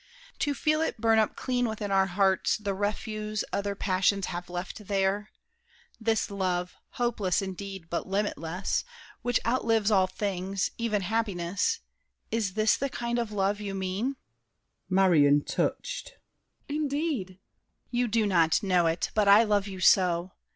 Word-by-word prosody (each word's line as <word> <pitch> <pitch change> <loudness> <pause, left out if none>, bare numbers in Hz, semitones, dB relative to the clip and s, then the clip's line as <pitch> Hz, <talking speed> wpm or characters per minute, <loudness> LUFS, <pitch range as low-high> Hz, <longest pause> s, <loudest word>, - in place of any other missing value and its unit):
To 290 -1 0
feel 310 +2 +1
it 320 - -2
burn 225 0 +4
up 215 - +1
clean 245 -1 0
within 215 -2 -4
our 195 0 +4
hearts 190 0 +2
The 205 -2 -3
refuse 210 +1 -2
other 200 0 -1
passions 195 0 +1
have 175 0 -5
left 180 +3 -6
there? 200 +1 0 0.7
This 220 -2 0
love, 180 -2 -1 0.2
hopeless 220 -7 0
indeed, 195 -2 -6
but 170 - -3
limitless, 190 -2 -1 0.4
Which 245 -1 +1
outlives 225 -3 +2
all 190 -2 +4
things, 195 -1 -2
even 215 -4 0
happiness— 200 - -1 0.5
Is 215 -4 -1
this 215 0 +3
the 275 - -1
kind 235 -2 -2
of 230 -2 -2
love 205 0 0
you 200 -1 -4
mean? 195 +8 -2 0.7
MARION 160 -7 +4
(touched). - - -2 0.5
Indeed! 290 - -1
DIDIER. 185 -1 -17 0.5
You 245 0 +1
do 225 -1 +1
not 170 -1 +3
know 180 -3 +3
it, 165 +1 -1
but 210 -1 +2
I 205 +3 +8
love 205 -2 +1
you 190 -2 -7
so! 180 -1 +4
200 Hz, 145 wpm, -28 LUFS, 185-225 Hz, 0.7 s, I